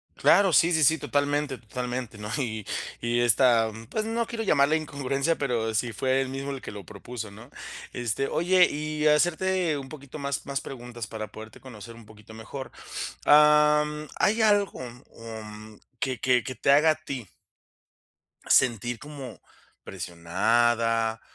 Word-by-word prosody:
Claro, 200 -2 +4
sí, 170 +2 +4
sí, 160 -1 +3
sí, 160 +4 +5
totalmente 145 -2 -1
totalmente, 125 0 -5
¿no?, 105 0 -7
y 110 -6 -3 0.4
y 120 +1 0
esta, 120 -1 +4 0.2
pues 215 - -1
no 230 +1 -1
quiero 225 -1 -4
llamarla 150 -5 +3
incongruencia, 140 0 -1
pero 115 -5 -1
sí 120 +2 0
fue 130 +3 +1
él 135 - -3
mismo 135 +1 -5
el 135 -1 -6
que - - -7
lo 100 -1 -9
propuso, 110 +1 -8
¿no? 110 +7 -14 0.4
este, 120 +3 -2
oye, 180 +1 +4
y 150 +1 -3
hacerte 170 +1 +2
un 135 -1 -8
poquito 140 -1 -10
más 140 -2 -3
más 140 0 -1
preguntas 120 -3 -8
para 110 0 -6
poderte 110 +1 -12
conocer 115 -3 -11
un 115 -2 -15
poquito 110 0 -15
mejor. 130 +5 -8 0.5
Am, 150 0 +5
¿hay 220 +2 +2
algo, 205 -6 +2
mm, 125 -1 -8 0.7
um, 105 - -18 0.2
que 130 -1 -2
que 125 -2 +3
que 130 - -5
te 140 - +1
haga 150 +3 +6
a - - +3
ti 135 -8 -7 1.2
sentir 120 -1 +2
como 145 -5 -9 0.4
presionada 115 +6 0
130 Hz, 155 wpm, -26 LUFS, 115-150 Hz, 1.2 s, haga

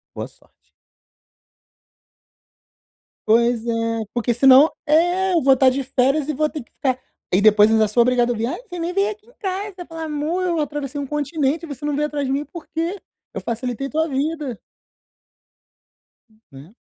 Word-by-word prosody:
boa - - -5
sorte". - - -28 2.6
Pois 235 +1 +3
é. 230 -1 -1
Porque, 240 0 0
senão 270 +4 +7 0.2
é, 350 +5 +2
eu 330 - +3
vou 270 0 +6
estar 260 0 +4
de 270 +2 -2
férias 270 +3 +1
e 305 - -1
vou 305 +2 +1
ter 300 - -6
que - - -24
ficar 260 -2 -1 0.4
e 190 - +4
depois 210 0 +6
ainda 220 -1 +3
sou 235 +3 +3
obrigado 245 0 +2
a - - +1
ouvir: 225 -1 -3
"Ai, 335 - -4
você 355 -1 -7
nem 340 +2 -2
veio 395 +2 +1
aqui 425 +1 -11
em - - -21
casa". 385 -2 -5
Falar: 325 -1 -6
"Amor, 310 +4 -2
eu 340 -3 0
atravessei 290 -1 -4
um 280 - -4
continente 295 +1 -1
e - - -6
você 285 -1 -8
não 295 - -1
veio 300 +1 0
atrás 290 -2 -3
de 265 - -1
mim, 285 +2 -1
por 340 +1 -11
quê? 340 +5 -2 0.3
Eu - - -5
facilitei 245 +3 -3
tua 315 +3 0
vida". 285 -3 -2 1.9
Né? 140 +10 -14
285 Hz, 180 wpm, -21 LUFS, 245-325 Hz, 2.6 s, senão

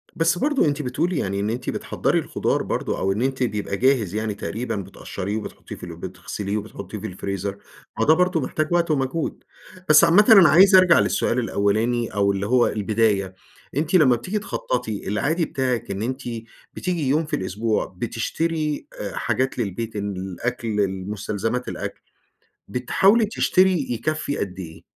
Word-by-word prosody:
بس 165 +1 +2
برضو 290 - +2
أنتِ 145 0 0
بتقولي 150 +6 -1
يعني 100 -5 -1
إن 105 +2 -1
أنتِ 125 +3 -3
بتحضّري - - 0
الخضار - - -1
برضو - - -2
أو 95 - 0
إن 105 +4 -1
أنتِ 130 0 0
بيبقى 105 -3 -2
جاهز 120 -7 +2
يعني 110 -1 -1
تقريبًا 115 +4 -4
بتقشريه 100 +1 -5
وبتحطيه 110 - -8
في - - -15
ال 85 -1 -8
بتغسليه 95 +3 -5
وبتحطيه 105 0 -7
في 110 +2 -5
الفريزر، 100 +1 -4 0.4
ما 115 - +3
ده 155 - +6
برضو 180 -1 +2
محتاج 155 +4 -1
وقت 170 -2 +2
ومجهود، 135 +3 -2 0.5
بس 155 +1 +8
عامةً 175 +5 +6
أنا 195 -7 +9
عايز 190 +4 +7
أرجع 185 -2 +7
للسؤال 120 - +1
الأولاني 115 +2 +1
أو 100 -1 +2
اللي 100 0 -2
هو 125 0 +4
البداية، 105 -2 0 0.4
أنتِ 155 +4 -1
لمّا 135 -8 +6
بتيجي 185 - -3
تخططي، 120 - -3
العادي 145 - 0
بتاعك 125 -6 -2
إن 100 +1 -4
أنتِ 130 +3 -3 0.5
بتيجي 175 -6 -2
يوم 155 +3 +2
في 150 - -2
الأسبوع 105 +4 -1
بتشتري 160 -2 -2
آآ، - - -5
حاجات 130 0 -1
للبيت، 110 +1 -3
الأكْل، 100 +4 -4
المستلزمات، 100 +5 -2
الأكْل، - - -5 0.7
بتحاولي 195 - +3
تشتري 185 -7 +2
يكَفّي 145 +5 -2
قدّ 95 -1 -4
إيه؟ 80 -3 -9
120 Hz, 160 wpm, -23 LUFS, 100-155 Hz, 0.7 s, أنا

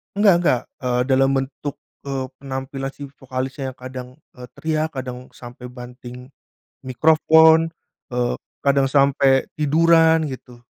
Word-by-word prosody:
Nggak 205 -1 +5
nggak, 130 -8 +2 0.2
eee, 125 -1 +1
dalam 135 0 +4
bentuk, 135 +2 -4 0.3
eee, 135 -1 -2
penampilan 135 0 -5
si 145 - -10
vokalisnya 130 0 -5
yang - - -38
kadang, 130 -1 -7 0.3
eee, 125 0 -9
teriak, 155 0 -1
kadang 125 -1 -6
sampai 120 0 -10
banting 125 +1 -11 0.5
mikrofon, 160 +4 +4 0.4
eee, 120 0 0 0.3
kadang 140 -1 +2
sampai 135 -1 +3
tiduran 160 +1 +4
gitu. 125 -2 -10
135 Hz, 125 wpm, -21 LUFS, 125-155 Hz, 0.5 s, Nggak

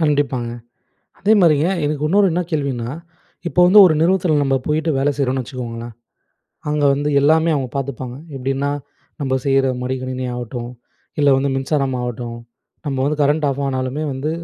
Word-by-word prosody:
கண்டிப்பாங்க. 145 -6 0 0.7
அதேமாரிங்க, 175 -7 +4 0.2
எனக்கு 150 0 -1
இன்னொரு 200 +4 +4
என்ன 175 - 0
கேள்வினா, 135 -6 -2 0.6
இப்ப 175 - -8
வந்து 200 +4 +7
ஒரு 170 - +4
நிறுவனத்துல 175 -1 +2
நம்ப 135 -1 +1
போயிட்டு 155 +2 0
வேலை 140 +2 +2
செய்யுறோம்னு 130 -2 0
வச்சுக்கோங்களேன், 120 -2 -7 0.8
அங்க 150 0 0
வந்து 145 +2 -1
எல்லாமே 160 +3 +4
அவங்க 135 -3 -2
பாத்துப்பாங்க. 130 -2 -4 0.2
எப்படின்னா, 135 +2 -1 0.5
நம்ப 135 -2 -1
செய்யுற 135 -1 +3 0.2
மடி 130 +1 -1
கணினி 130 0 -4
ஆகட்டும் 120 0 -5 0.5
இல்ல, 145 -1 +4
வந்து 140 +1 0
மின்சாரம் 135 0 0
ஆகட்டும், 120 -1 -5 0.5
நம்ப 135 -2 -2
வந்து 150 +1 -1
கரண்ட் 145 +2 +2
ஆஃப் 140 +1 -3
ஆனாலுமே 130 +2 -2
வந்து 135 +3 -3
140 Hz, 150 wpm, -19 LUFS, 130-150 Hz, 0.8 s, வந்து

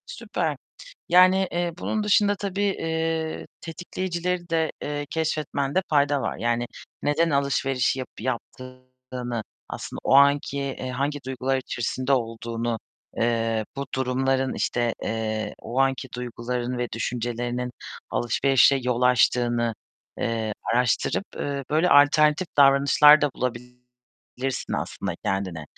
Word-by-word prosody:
Süper, - - -3 0.5
yani, 185 +2 +5
eee, 175 0 -1
bunun 215 +3 -2
dışında 205 0 +3
tabii, 200 0 -3
eee, 160 -4 -1
tetikleyicileri 175 +1 -4
de, 160 -2 +1
eee, 145 0 -3
keşfetmende 155 0 -1
fayda 145 -1 +2
var. - - -3
Yani 120 +1 0 0.4
neden 160 +3 +2
alışverişi 135 -2 +1
yapı 130 -4 -8
yaptığını, 130 -1 -6 0.3
aslında - - -6
o - - +3
anki, 140 0 +4
eee, 135 -2 -4
hangi 140 +3 -2
duygular 130 0 -1
içerisinde 130 +1 -2
olduğunu, 115 -1 -1 0.4
eee, 115 -1 0
bu 140 0 -3
durumların, 130 +1 0
işte, 120 -1 0
eee, 110 -1 -2
o 125 +3 -3
anki 135 0 +1
duyguların 125 0 -3
ve 120 0 -1
düşüncelerinin 120 +1 -3 0.4
alışverişe 135 +3 +3
yol 125 0 -1
açtığını, 120 -2 +3 0.4
eee, 110 -2 -1 0.2
araştırıp, 125 - +1
eee, 140 -1 -3
böyle 160 +4 +3
alternatif 150 +4 +5
davranışlar 140 +2 +7
da 145 - +1
bulabilirsin 125 +1 -6
aslında - - -3
kendine. 95 -5 -2
130 Hz, 115 wpm, -25 LUFS, 120-150 Hz, 0.5 s, davranışlar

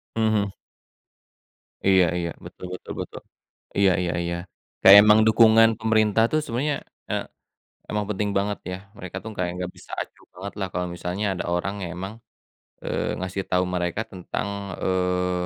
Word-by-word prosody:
Mhm 115 - +2
mhm. 100 -2 +1 1.4
Iya 95 -2 +6
iya. 85 -1 -2 0.2
Betul - - -9
betul - - -7
betul. - - -8 0.6
Iya 100 -1 +5
iya 85 - -1
iya. 85 0 -2 0.5
Kayak 95 +1 +11
emang 105 0 +7
dukungan 115 0 +7
pemerintah 110 -1 +3
tuh, 155 - +2
sebenernya, 140 +4 -1 0.3
eee, - - -1 0.7
emang 105 0 -1
penting 105 0 -1
banget, 100 +1 -1
ya. 90 - -3 0.2
Mereka 90 0 -8
tuh, 110 - -6
kayak 90 -1 0
nggak 90 0 -4
bisa - - -14
acuh - - -10
banget 100 +2 -7
lah 95 - -1
kalo 90 - -1
misalnya 90 +4 -3
ada 90 - -4
orang 95 +3 -1
yang 85 - -4
emang, 95 +3 -5 0.7
eee, - - -1
ngasih 95 +1 -3
tau 90 0 +3
mereka 90 +4 -1
tentang, 95 +2 -4 0.4
eee, 90 -1 0
95 Hz, 160 wpm, -24 LUFS, 90-105 Hz, 1.4 s, Kayak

